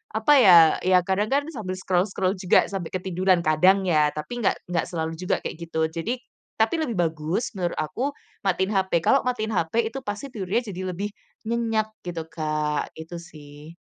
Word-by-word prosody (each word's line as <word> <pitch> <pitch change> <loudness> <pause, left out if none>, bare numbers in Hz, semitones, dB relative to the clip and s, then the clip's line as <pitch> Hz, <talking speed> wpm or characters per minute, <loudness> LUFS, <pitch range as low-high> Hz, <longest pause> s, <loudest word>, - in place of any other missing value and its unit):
apa 220 +6 +2
ya, 185 -8 +9 0.3
ya 185 -1 +5
kadang 190 +3 0
kan 280 +4 +1
sambil 215 - -5
scroll-scroll 185 +1 0
juga 180 0 +3
sampai 190 -4 -3
ketiduran, 185 -1 +1
kadang 180 +5 +4
ya 155 -5 +3
tapi 240 +11 -5
enggak 215 - +2
enggak 170 -2 0
selalu 160 -2 -3
juga 180 - -1
kayak - - -5
gitu. 160 -1 0
Jadi 225 +10 -3 0.3
tapi 225 +9 +1
lebih 260 -8 -2
bagus 165 +3 -1
menurut 180 -4 -3
aku, 270 - -2 0.2
matiin 190 0 0
HP, 190 -4 +1
kalau 275 - +5
matiin 225 -3 -1
HP 220 +5 0
itu 270 - -5
pasti 210 +7 -5
tidurnya 215 +2 -1
jadi 185 0 -6
lebih 205 +3 -3 0.4
nyenyak 225 -2 0
gitu 170 -2 -5
Kak, 155 -1 -2
itu 165 +2 -8
sih. 150 -1 -13
185 Hz, 175 wpm, -24 LUFS, 165-220 Hz, 0.4 s, ya